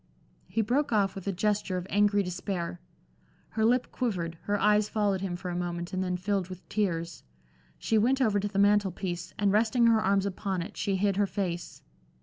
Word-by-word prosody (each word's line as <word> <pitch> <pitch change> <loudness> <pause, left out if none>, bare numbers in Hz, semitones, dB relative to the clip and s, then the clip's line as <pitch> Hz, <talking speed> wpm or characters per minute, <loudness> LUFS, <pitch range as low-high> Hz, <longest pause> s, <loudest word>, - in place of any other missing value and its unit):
He 225 - 0
broke 260 +7 +1
off 200 -3 +2
with 195 0 -8
a - - +2
gesture 200 0 0
of 180 - -4
angry 205 0 +3
despair. 180 -1 -4 0.7
Her 220 - -1
lip 245 +3 +2
quivered, 175 -9 -2
her 205 0 0
eyes 210 0 +3
followed 205 -3 0
him 190 -2 -2
for 180 +1 -6
a - - -3
moment 175 0 -3
and 185 0 0
then 180 -1 -1
filled 190 0 -1
with 185 0 -10
tears. 170 -6 -1 0.6
She 220 - +1
went 255 +5 +2
over 215 -6 +2
to 205 - -1
the 200 -1 -5
mantel 205 0 +4
piece, 175 -1 -5
and 205 -2 +2
resting 225 +3 +3
her 225 -1 +5
arms 195 -1 +2
upon 190 -2 -2
it, 205 +4 -10
she 195 - -1
hid 195 0 +1
her 205 -1 +3
face. 180 -4 -4
200 Hz, 200 wpm, -29 LUFS, 180-210 Hz, 0.7 s, her